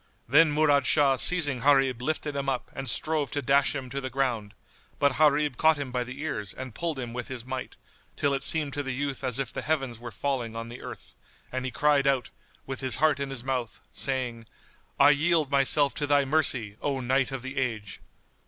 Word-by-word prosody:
Then 150 Hz, +5 st, +5 dB
Murad 145 Hz, -2 st, +3 dB
Shah 140 Hz, -3 st, +3 dB
seizing 145 Hz, -5 st, +4 dB
Gharib 135 Hz, -2 st, +3 dB
lifted 150 Hz, +1 st, -2 dB
him 140 Hz, -1 st, -2 dB
up 130 Hz, -2 st, -3 dB
and 135 Hz, -2 st, -4 dB
strove 150 Hz, +4 st, -1 dB
to 145 Hz, -, -2 dB
dash 140 Hz, +2 st, +3 dB
him 135 Hz, -2 st, -5 dB
to 140 Hz, +1 st, -3 dB
the 130 Hz, -, -4 dB
ground; 120 Hz, -6 st, -2 dB, 0.4 s
but 140 Hz, -2 st, +1 dB
Gharib 150 Hz, -3 st, +3 dB
caught 160 Hz, -1 st, +4 dB
him 140 Hz, -3 st, -5 dB
by 125 Hz, 0 st, -1 dB
the 130 Hz, +3 st, -9 dB
ears 105 Hz, -, -4 dB
and 130 Hz, -2 st, -7 dB
pulled 165 Hz, 0 st, -3 dB
him 120 Hz, -3 st, -5 dB
with 125 Hz, -, -5 dB
his 125 Hz, -3 st, -6 dB
might, 130 Hz, 0 st, -6 dB, 0.4 s
till 145 Hz, -1 st, 0 dB
it 135 Hz, -, -1 dB
seemed 150 Hz, -3 st, +3 dB
to 145 Hz, -, -2 dB
the 135 Hz, -2 st, -4 dB
youth 140 Hz, 0 st, -3 dB
as 130 Hz, -2 st, 0 dB
if 135 Hz, -3 st, -3 dB
the -, -, -4 dB
heavens 135 Hz, -7 st, -2 dB
were 120 Hz, 0 st, -8 dB
falling 120 Hz, -1 st, -3 dB
on 115 Hz, 0 st, -6 dB
the 120 Hz, -, -9 dB
earth[FN#78] -, -, -10 dB, 0.4 s
and 130 Hz, 0 st, -3 dB
he -, -, -1 dB
cried 145 Hz, +1 st, +2 dB
out, 130 Hz, -5 st, 0 dB, 0.3 s
with 135 Hz, -1 st, -5 dB
his 130 Hz, -4 st, +1 dB
heart 155 Hz, +1 st, +2 dB
in 140 Hz, -1 st, -3 dB
his 135 Hz, -3 st, -4 dB
mouth, 125 Hz, -3 st, -3 dB
saying, 125 Hz, -4 st, -2 dB, 0.5 s
"I 145 Hz, +1 st, +7 dB
yield 155 Hz, -1 st, +1 dB
myself 140 Hz, +1 st, +3 dB
to 145 Hz, -1 st, -3 dB
thy 145 Hz, -1 st, +3 dB
mercy, 130 Hz, -8 st, +3 dB
O 140 Hz, -2 st, -1 dB
Knight 130 Hz, +1 st, +1 dB
of 135 Hz, -2 st, -6 dB
the 130 Hz, +2 st, -7 dB
Age!" 110 Hz, -6 st, -3 dB
135 Hz, 215 wpm, -27 LUFS, 125-145 Hz, 0.5 s, I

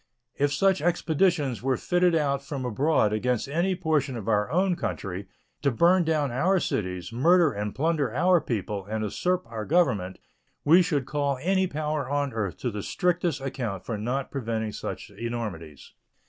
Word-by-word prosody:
If 145 Hz, 0 st, +1 dB
such 190 Hz, +7 st, +2 dB
expeditions 165 Hz, -4 st, +1 dB
were 130 Hz, 0 st, +1 dB
fitted 180 Hz, -1 st, +2 dB
out 140 Hz, -3 st, 0 dB
from 140 Hz, -2 st, -5 dB
abroad 125 Hz, -2 st, +2 dB
against 125 Hz, +3 st, 0 dB
any 170 Hz, +6 st, 0 dB
portion 155 Hz, -7 st, 0 dB
of 110 Hz, -2 st, -7 dB
our 105 Hz, 0 st, +2 dB
own 180 Hz, +4 st, +2 dB
country, 95 Hz, -, -4 dB, 0.3 s
to 140 Hz, -, +3 dB
burn 175 Hz, +8 st, +4 dB
down 155 Hz, -4 st, +1 dB
our 180 Hz, +10 st, +2 dB
cities, 90 Hz, -, -3 dB
murder 165 Hz, +5 st, +4 dB
and 105 Hz, -2 st, -4 dB
plunder 150 Hz, -4 st, 0 dB
our 175 Hz, +6 st, +3 dB
people, 105 Hz, -5 st, -3 dB
and 110 Hz, +1 st, -2 dB
usurp 180 Hz, -, -1 dB
our 115 Hz, -2 st, -5 dB
Government, 105 Hz, -, +1 dB, 0.5 s
we 170 Hz, +5 st, +7 dB
should 150 Hz, -6 st, 0 dB
call 140 Hz, -1 st, -1 dB
any 190 Hz, +4 st, +1 dB
power 150 Hz, -4 st, -2 dB
on 145 Hz, -2 st, -1 dB
earth 105 Hz, -5 st, -3 dB
to 125 Hz, -, -1 dB
the 105 Hz, -1 st, -4 dB
strictest 175 Hz, -, 0 dB
account 115 Hz, -8 st, -4 dB
for 115 Hz, -, -3 dB
not 125 Hz, +6 st, -3 dB
preventing 110 Hz, -5 st, -2 dB
such -, -, -6 dB
enormities. 105 Hz, -, -6 dB
140 Hz, 165 wpm, -26 LUFS, 110-165 Hz, 0.5 s, we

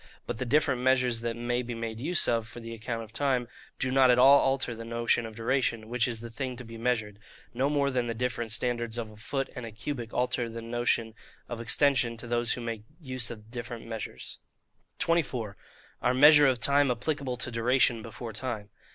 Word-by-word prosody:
But 120 Hz, -, -4 dB
the 130 Hz, -, -1 dB
different 135 Hz, -1 st, +2 dB
measures 125 Hz, -2 st, +2 dB
that 115 Hz, -1 st, -2 dB
may 120 Hz, +1 st, -1 dB
be 120 Hz, -1 st, -5 dB
made 115 Hz, -1 st, -4 dB
use 170 Hz, +8 st, +1 dB
of 115 Hz, -2 st, +1 dB
for 120 Hz, -, -9 dB
the 115 Hz, 0 st, -7 dB
account 115 Hz, +1 st, -4 dB
of 110 Hz, 0 st, -14 dB
time, 130 Hz, -2 st, +1 dB, 0.3 s
do 130 Hz, -, -1 dB
not 130 Hz, -1 st, +5 dB
at 125 Hz, -, +6 dB
all 135 Hz, +3 st, +8 dB
alter 135 Hz, -2 st, +1 dB
the 115 Hz, 0 st, -7 dB
notion 115 Hz, 0 st, 0 dB
of 110 Hz, -, -11 dB
duration, 115 Hz, -1 st, 0 dB
which 120 Hz, 0 st, +1 dB
is 115 Hz, -2 st, -4 dB
the 115 Hz, 0 st, -8 dB
thing 130 Hz, +1 st, -4 dB
to 130 Hz, -, -8 dB
be 115 Hz, 0 st, -10 dB
measured; 110 Hz, -3 st, -1 dB, 0.3 s
no 130 Hz, +4 st, +1 dB
more 140 Hz, -1 st, +1 dB
than 125 Hz, -2 st, 0 dB
the 115 Hz, -, -2 dB
different 120 Hz, -1 st, -2 dB
standards 120 Hz, 0 st, 0 dB
of 115 Hz, -2 st, -4 dB
a -, -, -14 dB
foot 135 Hz, +5 st, -3 dB
and 125 Hz, -, -5 dB
a 115 Hz, -, -6 dB
cubit 115 Hz, +1 st, -5 dB
alter 125 Hz, -1 st, 0 dB
the 115 Hz, 0 st, -6 dB
notion 115 Hz, -1 st, 0 dB, 0.3 s
of 120 Hz, -1 st, -5 dB
extension 130 Hz, -1 st, +2 dB
to 120 Hz, -, -7 dB
those 120 Hz, 0 st, 0 dB
who 125 Hz, -, -5 dB
make 115 Hz, -2 st, -4 dB, 0.2 s
use 130 Hz, -6 st, -2 dB
of 110 Hz, -2 st, -8 dB
those 110 Hz, -, -21 dB
different 120 Hz, -1 st, -6 dB
measures. 115 Hz, -1 st, -6 dB, 0.6 s
24. 130 Hz, -11 st, 0 dB, 0.5 s
Our 125 Hz, +1 st, +2 dB
Measure 150 Hz, +2 st, +8 dB
of 130 Hz, -2 st, +2 dB
Time 140 Hz, +2 st, +4 dB
applicable 130 Hz, +1 st, -2 dB
to 120 Hz, -, -2 dB
Duration 120 Hz, 0 st, +3 dB
before 115 Hz, +1 st, -7 dB
Time. 110 Hz, -3 st, -4 dB
120 Hz, 210 wpm, -29 LUFS, 115-130 Hz, 0.6 s, all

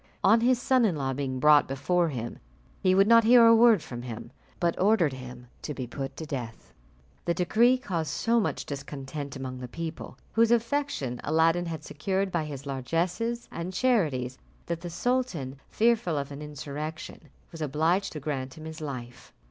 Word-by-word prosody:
On 220 Hz, +4 st, +5 dB
his 245 Hz, +1 st, +3 dB
son 255 Hz, -1 st, +3 dB
in 200 Hz, -7 st, +2 dB
law 135 Hz, -2 st, -2 dB
being 130 Hz, -1 st, -3 dB
brought 150 Hz, +1 st, +6 dB
before 165 Hz, +6 st, +1 dB
him, 120 Hz, -4 st, -5 dB, 0.4 s
he 185 Hz, 0 st, +3 dB
would 195 Hz, +1 st, +6 dB
not 230 Hz, 0 st, +7 dB
hear 235 Hz, +1 st, +7 dB
a 230 Hz, 0 st, +8 dB
word 225 Hz, -6 st, +5 dB
from 120 Hz, -1 st, -7 dB
him, 115 Hz, -1 st, -7 dB, 0.3 s
but 170 Hz, -1 st, +1 dB
ordered 190 Hz, -8 st, +3 dB
him 125 Hz, -1 st, -9 dB, 0.2 s
to 150 Hz, -, -5 dB
be 130 Hz, -, -4 dB
put 135 Hz, +3 st, -6 dB
to 160 Hz, -, -5 dB
death. 125 Hz, -7 st, -7 dB, 0.5 s
The 170 Hz, -, +1 dB
decree 235 Hz, +8 st, +3 dB
caused 170 Hz, -, -3 dB
so 230 Hz, +9 st, +1 dB
much 210 Hz, -, -2 dB
discontent 140 Hz, 0 st, -6 dB
among 130 Hz, -1 st, -6 dB
the 125 Hz, -, -6 dB
people, 165 Hz, +5 st, -7 dB, 0.2 s
whose 230 Hz, 0 st, +4 dB
affection 235 Hz, -, 0 dB
Aladdin 165 Hz, +3 st, +2 dB
had 160 Hz, -2 st, -5 dB
secured 190 Hz, +7 st, -2 dB
by 170 Hz, -3 st, -1 dB
his 140 Hz, -2 st, -7 dB
largesses 175 Hz, -, -2 dB
and 170 Hz, +2 st, -5 dB
charities, 155 Hz, -, 0 dB, 0.3 s
that 170 Hz, -1 st, -3 dB
the 175 Hz, -, -5 dB
sultan, 175 Hz, -, -1 dB
fearful 225 Hz, -8 st, +2 dB
of 140 Hz, 0 st, -3 dB
an 140 Hz, +1 st, -7 dB
insurrection, 150 Hz, +1 st, -6 dB, 0.3 s
was 165 Hz, -, -9 dB
obliged 160 Hz, +7 st, +1 dB
to 155 Hz, -, -5 dB
grant 135 Hz, -2 st, -4 dB
him 155 Hz, -, -9 dB
his 160 Hz, 0 st, -8 dB
life. 125 Hz, -5 st, -7 dB
160 Hz, 180 wpm, -27 LUFS, 135-200 Hz, 0.5 s, a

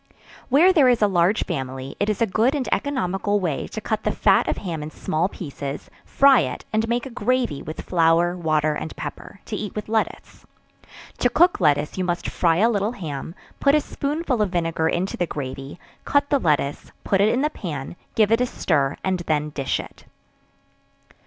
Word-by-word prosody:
Where 325 Hz, +8 st, +6 dB
there 285 Hz, -7 st, +5 dB
is 240 Hz, -3 st, +3 dB
a -, -, +6 dB
large 185 Hz, +1 st, +2 dB
family, 130 Hz, -4 st, -5 dB
it 205 Hz, -, +1 dB
is 215 Hz, +2 st, +1 dB
a -, -, +4 dB
good 225 Hz, +7 st, +1 dB
and 275 Hz, -3 st, -2 dB
economical 205 Hz, -7 st, 0 dB
way 170 Hz, -7 st, -2 dB
to -, -, -6 dB
cut 215 Hz, 0 st, -2 dB
the -, -, +1 dB
fat -, -, +3 dB
of -, -, -1 dB
ham 170 Hz, -5 st, -4 dB
in 150 Hz, -, -5 dB
small 160 Hz, +3 st, -1 dB
pieces, 140 Hz, -5 st, -7 dB
fry 275 Hz, -3 st, +5 dB
it, 130 Hz, -6 st, -3 dB
and 220 Hz, +1 st, +1 dB
make 240 Hz, +2 st, 0 dB
a 265 Hz, -, -7 dB
gravy 240 Hz, -, 0 dB
with 155 Hz, -, -6 dB
flour, 170 Hz, 0 st, +2 dB
water 155 Hz, -3 st, +1 dB
and 155 Hz, -, -5 dB
pepper, 200 Hz, -, -8 dB
to 220 Hz, -, -4 dB
eat 210 Hz, -1 st, -5 dB
with 210 Hz, -, -4 dB
lettuce. 220 Hz, 0 st, -2 dB, 0.8 s
To -, -, +3 dB
cook 350 Hz, +1 st, +4 dB
lettuce 150 Hz, 0 st, +1 dB
you -, -, +1 dB
must 175 Hz, -1 st, -2 dB
fry 165 Hz, -2 st, +2 dB
a 215 Hz, +5 st, +4 dB
little 205 Hz, +1 st, 0 dB
ham; 160 Hz, -, -6 dB, 0.2 s
put 280 Hz, +1 st, +4 dB
a -, -, +5 dB
spoonful 290 Hz, -4 st, -2 dB
of 210 Hz, -, +1 dB
vinegar 165 Hz, -2 st, 0 dB
into 185 Hz, +3 st, -2 dB
the 175 Hz, -, 0 dB
gravy; 135 Hz, +1 st, -6 dB, 0.2 s
cut 285 Hz, 0 st, +1 dB
the 285 Hz, -, +4 dB
lettuce, 150 Hz, -, 0 dB
put 195 Hz, -1 st, +2 dB
it 210 Hz, -, +4 dB
in 250 Hz, +4 st, +1 dB
the 300 Hz, -, +1 dB
pan; 155 Hz, -, -6 dB, 0.2 s
give 215 Hz, -1 st, +3 dB
it 230 Hz, +2 st, +4 dB
a 250 Hz, -, +2 dB
stir, 145 Hz, -, 0 dB
and 190 Hz, -1 st, 0 dB
then 150 Hz, -1 st, 0 dB
dish 140 Hz, -3 st, -1 dB
it. -, -, -10 dB
185 Hz, 195 wpm, -23 LUFS, 155-230 Hz, 0.8 s, Where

